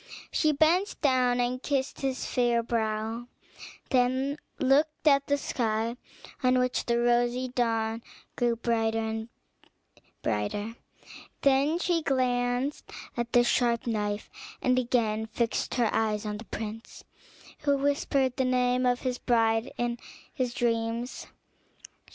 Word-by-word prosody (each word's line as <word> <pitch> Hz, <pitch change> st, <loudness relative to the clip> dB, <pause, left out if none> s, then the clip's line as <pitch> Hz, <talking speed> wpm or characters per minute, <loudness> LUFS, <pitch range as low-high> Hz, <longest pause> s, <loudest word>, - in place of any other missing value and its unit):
She 310 Hz, -, +3 dB
bent 330 Hz, +7 st, +2 dB
down 250 Hz, -3 st, +3 dB
and 245 Hz, +1 st, 0 dB
kissed 275 Hz, -2 st, -2 dB
his 265 Hz, -1 st, -2 dB
fair 240 Hz, -2 st, +1 dB
brow, 225 Hz, +1 st, -2 dB, 0.6 s
then 260 Hz, +3 st, +1 dB, 0.2 s
looked 295 Hz, +3 st, +2 dB
at 280 Hz, -1 st, +5 dB
the 285 Hz, -, +2 dB
sky 230 Hz, -3 st, -1 dB, 0.5 s
on 255 Hz, -1 st, +3 dB
which 250 Hz, 0 st, 0 dB
the 235 Hz, 0 st, +2 dB
rosy 240 Hz, +1 st, +2 dB
dawn 225 Hz, -2 st, 0 dB, 0.3 s
grew 240 Hz, -1 st, +1 dB
brighter 225 Hz, -1 st, 0 dB
and 220 Hz, 0 st, -3 dB, 0.9 s
brighter; 205 Hz, -, -2 dB, 0.7 s
then 280 Hz, +4 st, +3 dB
she 350 Hz, -1 st, +1 dB
glanced 250 Hz, 0 st, 0 dB, 0.3 s
at 240 Hz, 0 st, -3 dB
the 245 Hz, -, +6 dB
sharp 240 Hz, -1 st, +1 dB
knife, 210 Hz, -3 st, -2 dB, 0.3 s
and 255 Hz, 0 st, +2 dB
again 225 Hz, -3 st, 0 dB
fixed 230 Hz, +1 st, -1 dB
her 240 Hz, -3 st, +1 dB
eyes 215 Hz, -1 st, 0 dB
on 210 Hz, 0 st, -3 dB
the 225 Hz, -, -10 dB
prince, 220 Hz, +2 st, -7 dB, 0.6 s
who 285 Hz, -2 st, +2 dB
whispered 275 Hz, -2 st, +1 dB
the 265 Hz, -, +2 dB
name 250 Hz, 0 st, +2 dB
of 245 Hz, 0 st, +1 dB
his 250 Hz, -2 st, -2 dB
bride 225 Hz, 0 st, +2 dB
in 240 Hz, 0 st, -1 dB, 0.3 s
his 255 Hz, -2 st, -1 dB
dreams. 230 Hz, +1 st, -1 dB
245 Hz, 125 wpm, -28 LUFS, 225-260 Hz, 0.9 s, the